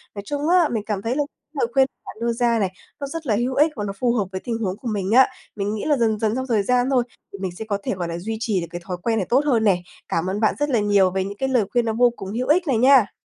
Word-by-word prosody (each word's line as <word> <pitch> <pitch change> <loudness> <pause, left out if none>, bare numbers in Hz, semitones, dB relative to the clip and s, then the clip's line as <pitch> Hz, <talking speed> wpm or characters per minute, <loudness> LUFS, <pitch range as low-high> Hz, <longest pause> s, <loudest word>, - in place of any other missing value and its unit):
nói 200 - -4
chung 290 +5 -2
á, 350 -3 +4
mình 220 -3 -1
cảm 205 -3 -2
thấy 230 +4 -1
là 290 - +1
cái 300 - -59
lời 235 - +2
khuyên 265 +1 +4 0.2
bạn - - -9
đưa 235 0 +1
ra 235 -1 +1
này, 195 -3 0 0.3
nó 280 - -4
rất 325 +3 -6
là 215 - +2
hữu 245 +4 -1
ích 305 +3 +4
và 210 - -3
nó 200 -1 -3
phù 245 -2 +2
hợp 215 -5 +1
với 185 -1 -4
tình 235 -2 -2
huống 195 -4 -2
của 245 - -8
mình 205 -3 -2
á. 260 +3 +7 0.3
Mình 205 0 -2
nghĩ 210 - -4
là, 295 -2 +2
dần 220 -3 +1
dần 220 0 0
trong 260 +1 -3
thời 220 -5 +2
gian 250 +3 +2
thôi, 255 -3 +3 0.3
thì - - -6
mình 190 -1 -3
sẽ 220 - -6
có 205 -2 -1
thể, - - -2
gọi 175 -2 -3
là, 170 0 -4
duy 220 +6 -4
trì 215 -5 0
được 170 - -5
cái 175 0 -7
thói 180 0 -4
quen 230 -1 +1
này 190 - -1
tốt 255 +3 +4
hơn 240 -6 +2
nè. 190 -4 +3 0.3
Cảm 165 +2 -1
ơn 195 +2 -2
bạn 215 - +2
rất 290 0 0
là 245 -5 +2
nhiều 200 -3 +3
về 190 0 -1
những 200 +1 -6
cái 265 +3 -1
lời 250 -4 +3
khuyên 240 -1 +2
nó 225 - 0
vô 245 +2 +4
cùng 195 -2 -7
hữu 250 +3 -2
ích 345 +4 +3
này 260 -5 +2
nha. 255 -3 +5
225 Hz, 330 wpm, -22 LUFS, 200-255 Hz, 0.3 s, á